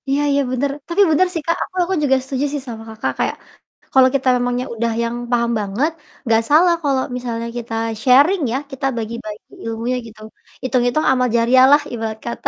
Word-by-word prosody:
Iya 280 +2 +1
iya, 280 0 +2
bener. 260 +3 0 0.2
Tapi 345 +4 +1
bener 370 +5 +4
sih, 330 - -2
Kak, 335 - +1
aku - - -12
aku 365 +2 -2
juga 270 -2 +3
setuju 270 +1 -2
sih 290 - -2
sama 225 -2 -7
Kakak, 220 0 -3
kayak - - 0 0.6
kalau 260 -1 +6
kita 265 -1 0
memangnya 245 0 -1
udah 230 +1 -1
yang 235 0 -2 0.2
paham 235 -1 +1
banget, 210 +10 -1 0.3
nggak 225 -1 +3
salah 340 +4 +5
kalau 275 -2 +1 0.2
misalnya 235 -2 -4
kita 235 -1 -6 0.3
sharing 285 - +5
ya, - - +1
kita 270 0 -5
bagi-bagi 220 -1 -6 0.2
ilmunya 230 +3 -2
gitu, 220 -1 -15 0.4
itung-itung 250 +3 +1
amal 250 -1 +2
jariah 245 +3 +5
lah, 290 +1 +6
ibarat 220 -2 -4
kata. 235 - -3
250 Hz, 190 wpm, -19 LUFS, 230-280 Hz, 0.6 s, kalau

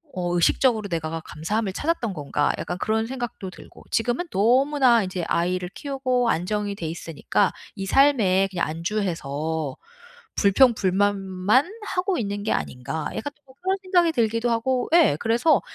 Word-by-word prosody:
어 175 -1 -1
의식적으로 215 +5 +2
내가 165 -1 -3
감사함을 195 +7 -3
찾았던 280 - -1
건가.' 145 -2 0
약간 175 - -4
그런 220 +2 0
생각도 240 -7 -5
들고. - - -14
지금은 245 +9 0
너무나 250 +3 +4
인제 185 -1 -4
아이를 180 +1 0
키우고 255 -4 -1
안정이 205 +3 -1
돼 165 -5 -5
있으니까 165 -1 -1 0.2
'이 195 -2 -4
삶에 210 -8 +4
그냥 175 -3 -1
안주해서 160 -4 -3 0.6
불평불만만 200 - +3 0.2
하고 370 0 -1
있는 205 -3 -3
게 220 - -1
아닌가.' 145 +5 -4
약간 285 +6 -4
또 295 - -37
뭐 260 - -18
그런 380 +1 0
생각이 355 -3 +3
들기도 230 -2 +1
하고 245 +2 0
예 330 - +5
그래서 235 +8 +3
210 Hz, 335 characters per minute, -24 LUFS, 180-255 Hz, 0.6 s, 예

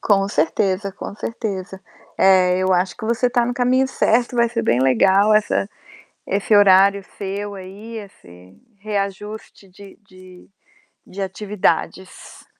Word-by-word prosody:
Com 195 -2 +2
certeza, 185 +4 0
com 200 - -8
certeza. 195 -4 -6 0.4
É, 185 -1 +4
eu 185 0 +1
acho 180 +1 0
que 230 - -8
você 235 +2 0
está 240 -1 +1
no 245 - -2
caminho 255 +1 +2
certo, 245 -1 0
vai 235 0 +3
ser 230 0 -3
bem 125 - +1
legal 190 - +3
essa 210 -2 +1 0.6
esse 205 +2 +1
horário 200 0 +5
seu 200 +1 -5
aí, 200 +5 -10
esse 90 - -14 0.2
reajuste 205 0 -6
de 195 +3 -15
de 185 -1 -16 0.6
de 195 - -8
atividades. 190 -2 -3
200 Hz, 135 wpm, -20 LUFS, 185-215 Hz, 0.6 s, horário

